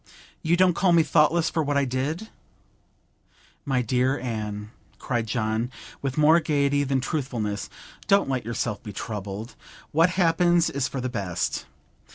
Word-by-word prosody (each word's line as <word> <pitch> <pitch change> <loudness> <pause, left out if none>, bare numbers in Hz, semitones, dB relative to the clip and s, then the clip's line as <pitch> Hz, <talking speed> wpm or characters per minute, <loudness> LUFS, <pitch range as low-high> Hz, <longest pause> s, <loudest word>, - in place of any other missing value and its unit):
You 170 +2 +2
don't 185 -1 +5
call 180 +1 +3
me 165 -1 +6
thoughtless 155 +2 +3
for 160 - 0
what 145 -1 0
I 140 - +2
did?' 145 - -3 1.4
'My 130 -3 +1
dear 125 +4 +1
Anne,' 105 -3 -4 0.3
cried 120 -3 -2
John, 110 +1 -1 0.3
with 135 0 -3
more 155 +2 +6
gaiety 145 -2 +1
than 135 -1 0
truthfulness, 120 - -3 0.4
'don't 200 0 +4
let 130 -2 -1
yourself 115 -2 -3
be 105 -4 -8
troubled! 105 +2 -5 0.4
What 165 +3 +4
happens 175 -1 +3
is 140 -1 -1
for 135 - -4
the 130 - -1
best. 95 -8 -2
135 Hz, 150 wpm, -25 LUFS, 115-160 Hz, 1.4 s, me